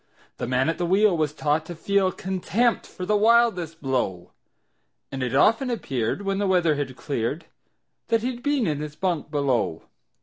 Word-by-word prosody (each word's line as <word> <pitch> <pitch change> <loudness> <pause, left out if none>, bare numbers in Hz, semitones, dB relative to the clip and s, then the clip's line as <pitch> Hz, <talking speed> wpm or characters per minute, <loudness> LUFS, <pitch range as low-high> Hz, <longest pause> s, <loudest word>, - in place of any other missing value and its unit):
The - - -3
man 130 +2 +1
at 165 - -1
the 175 - 0
wheel 195 +1 +4
was 155 -3 0
taught 150 +1 0
to 175 - -6
feel 195 +2 +1
Contempt 190 +6 0
for 185 - -7
the 210 - +2
wildest 210 -7 +2
blow, 100 -10 -2 0.8
And 135 - -4
it 125 0 -1
often 230 - +4
appeared, 135 - -2
when 195 0 -1
the 205 - +1
weather 175 -4 +3
had 140 -3 -4
cleared, 140 +5 -3 0.6
That 230 -1 +1
he'd 245 -1 -3
been 285 -4 +1
in 150 -3 -1
his 150 0 -6
bunk 175 -5 -2
below. 135 - 0
170 Hz, 175 wpm, -24 LUFS, 140-205 Hz, 0.8 s, wheel